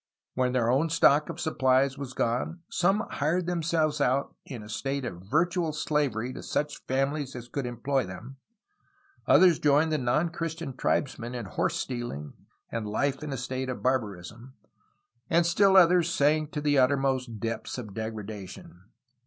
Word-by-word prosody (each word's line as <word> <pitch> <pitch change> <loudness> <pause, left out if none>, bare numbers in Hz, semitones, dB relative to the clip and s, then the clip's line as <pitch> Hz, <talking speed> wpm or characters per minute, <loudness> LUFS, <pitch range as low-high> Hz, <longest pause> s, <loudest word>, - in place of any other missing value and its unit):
When 125 -1 0
their 120 -2 +2
own 145 +6 +2
stock 150 -2 +4
of 170 0 -6
supplies 135 -3 +2
was 135 -2 -7
gone 125 +9 -1
some 195 +4 +2
hired 165 +5 0
themselves 160 -3 0
out 135 +1 +1
in 120 -5 -7
a - - -11
state 135 +5 -3
of 90 -7 -6
virtual 170 +3 +1
slavery 135 -6 -1
to - - -7
such 150 0 -3
families 135 +1 -1
as 120 -1 -7
could 130 +1 -3
employ 125 0 -1
them, 115 +9 -9 0.9
others 180 -4 +6
joined 150 +2 +3
the 155 - +1
non 135 +7 +1
Christian 165 -4 -5
tribesmen 125 -3 -1
in 120 -3 -4
horse 95 - -1
stealing 120 - -5 0.4
and 115 -2 -3
life 140 +5 0
in 150 -1 -5
a 135 - -3
state 130 +1 -3
of 130 - -5
barbarism, 115 0 -2 0.7
and 170 +1 +3
still 195 +3 +4
others 175 -1 +6
sank 155 -2 +2
to 150 - -2
the 145 -2 +3
uttermost 130 -3 +1
depths 115 +3 -4
of 110 -5 -7
degradation. 105 -4 -7
135 Hz, 160 wpm, -28 LUFS, 120-155 Hz, 0.9 s, others